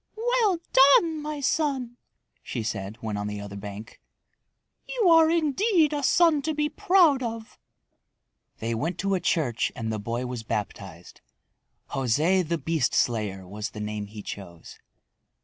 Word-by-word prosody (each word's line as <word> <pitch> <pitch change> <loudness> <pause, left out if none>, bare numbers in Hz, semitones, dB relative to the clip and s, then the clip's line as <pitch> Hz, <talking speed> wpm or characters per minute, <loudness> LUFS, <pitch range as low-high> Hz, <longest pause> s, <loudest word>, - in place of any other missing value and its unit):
"Well 455 -5 +2 0.2
done, 300 +4 +5
my 300 -1 -5
son!" 265 -4 -1 0.4
she 120 - -5
said 105 -2 -4
when 110 -2 -3
on 105 0 -3
the 105 0 -5
other 100 -1 -8
bank. 100 +2 -9 0.9
"You 465 -7 +2
are 325 -1 +6
indeed 330 - +2
a 290 - -1
son 320 +1 +4
to 310 +2 -2
be 300 0 0
proud 320 -3 +3
of!" 230 -2 -6 1.0
They 115 +1 -3
went 155 +11 -2
to 195 0 0
a 190 - +1
church 150 -9 0
and 110 -1 -3
the 110 - -3
boy 115 +4 -3
was 125 -2 -5
baptized. 95 -5 -6 0.7
José 150 +9 +2
the 170 +1 0
Beast 160 -1 0
Slayer 105 -5 0
was 105 +3 -5
the 105 - -10
name 105 -1 -4
he 105 0 -10
chose. 85 -4 -9
160 Hz, 150 wpm, -26 LUFS, -, 1.0 s, are